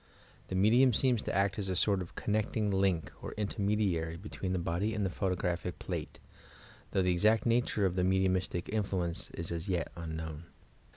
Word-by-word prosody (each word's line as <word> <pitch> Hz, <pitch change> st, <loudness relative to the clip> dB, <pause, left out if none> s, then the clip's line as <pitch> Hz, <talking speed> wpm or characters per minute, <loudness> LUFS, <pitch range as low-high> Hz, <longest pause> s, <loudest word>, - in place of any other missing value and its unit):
The -, -, -4 dB
aiedhni 110 Hz, +7 st, +5 dB
seeBs 125 Hz, -3 st, +2 dB
to -, -, -2 dB
act 100 Hz, +1 st, +2 dB
as 95 Hz, -2 st, -2 dB
a -, -, +1 dB
aoit 95 Hz, +1 st, +2 dB
of 90 Hz, -, -8 dB
oonnectin^ 105 Hz, -1 st, 0 dB
link 95 Hz, -4 st, +1 dB
or -, -, -6 dB
inleniediarT 100 Hz, -6 st, 0 dB
betveen 95 Hz, 0 st, -5 dB
the 95 Hz, -, +1 dB
body 90 Hz, +6 st, -1 dB
and 105 Hz, -2 st, 0 dB
the 95 Hz, -, -1 dB
photoeraphie 90 Hz, -2 st, -1 dB
plate, -, -, -5 dB, 0.7 s
thoo^ 95 Hz, -, +2 dB
the 90 Hz, 0 st, +3 dB
exael 105 Hz, +5 st, +3 dB
nature 115 Hz, -3 st, +2 dB
of 90 Hz, -, +1 dB
the 90 Hz, -, 0 dB
mediiuniitie 95 Hz, -1 st, +1 dB
infio 95 Hz, -4 st, -1 dB
enee 85 Hz, -, -5 dB
is 85 Hz, -, -3 dB
at 85 Hz, -1 st, -2 dB
jet 90 Hz, -3 st, -2 dB
unknown. 80 Hz, -1 st, -5 dB
95 Hz, 180 wpm, -32 LUFS, 85-105 Hz, 0.7 s, aiedhni